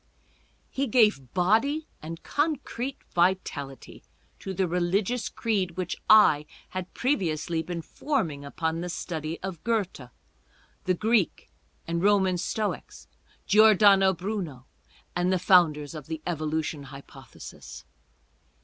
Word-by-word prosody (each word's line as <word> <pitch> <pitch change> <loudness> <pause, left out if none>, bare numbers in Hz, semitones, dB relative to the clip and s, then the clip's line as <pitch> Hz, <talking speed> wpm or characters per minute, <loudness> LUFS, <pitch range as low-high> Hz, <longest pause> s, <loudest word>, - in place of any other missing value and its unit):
He 275 +1 -1
gave 210 - +3
body 225 - +2 0.2
and 165 +2 -8
concrete 280 -4 -2
vitality 170 -6 -1 0.4
to 195 - -6
the 190 0 0
religious 185 +7 0
creed 190 -6 -2
which 185 -1 -2
I 155 -9 +6 0.2
had 185 -1 -6
previously 170 - 0
been 170 0 -5
forming 165 - -2
upon 160 +3 -3
the 180 - -4
study 165 -2 -4
of 185 -4 -6
Goethe, 200 - -2 0.8
the 185 - +2
Greek 215 -1 0 0.4
and 170 0 -1
Roman 190 -2 +3
Stoics, 210 +3 -4 0.4
Giordano 205 -2 +6
Bruno, 180 - -5 0.5
and 175 +1 +1
the 185 - +3
founders 165 -5 +3
of 150 -4 -8
the 160 -1 -5
Evolution 155 -3 -2
hypothesis. 135 +1 -12
180 Hz, 115 wpm, -27 LUFS, 160-210 Hz, 0.8 s, I